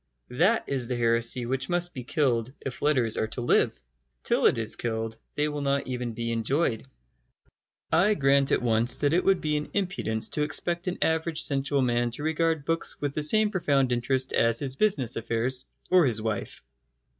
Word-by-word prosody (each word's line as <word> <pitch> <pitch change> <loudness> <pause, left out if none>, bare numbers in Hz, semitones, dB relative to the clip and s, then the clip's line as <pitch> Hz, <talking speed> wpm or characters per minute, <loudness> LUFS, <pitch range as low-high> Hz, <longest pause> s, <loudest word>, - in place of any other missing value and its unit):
That 180 - +2
is 130 -4 -2
the 125 - -2
heresy 115 +1 +1
which 135 +2 -2
must 175 0 -1
be 125 - -6
killed 125 -3 0
if 135 - -6
letters 125 -7 +2
are 110 - 0
to 120 +3 -4
live. 120 - +2 0.4
Till - - +3
it - - +2
is 110 -1 -1
killed 110 -1 -4 0.2
they 150 0 +1
will 150 -1 -4
not 140 0 0
even 125 -2 -4
be 115 +1 -3
enjoyed. 115 +2 0 1.0
I 195 +6 +4
grant 140 -2 +3
at - - +1
once 120 +1 +2
that 145 +1 +2
it 180 - +2
would 195 -2 +2
be 150 -1 0
an 150 - -5
impudence 175 - -1
to 150 - -3
expect 170 +4 -2
an 180 - -2
average 160 0 +1
sensual 140 -1 +1
man 120 -1 +1
to 145 - -6
regard 160 -1 0
books 165 +1 -1
with 145 -1 -2
the 155 - -2
same 215 +7 +2
profound 140 -9 +1
interest 130 +2 0
as 115 0 +2
his 135 -1 -2
business 140 - 0
affairs 120 +3 -1 0.3
or 180 -5 +5
his 115 -3 0
wife. 110 -1 -4
135 Hz, 190 wpm, -26 LUFS, 120-155 Hz, 1.0 s, or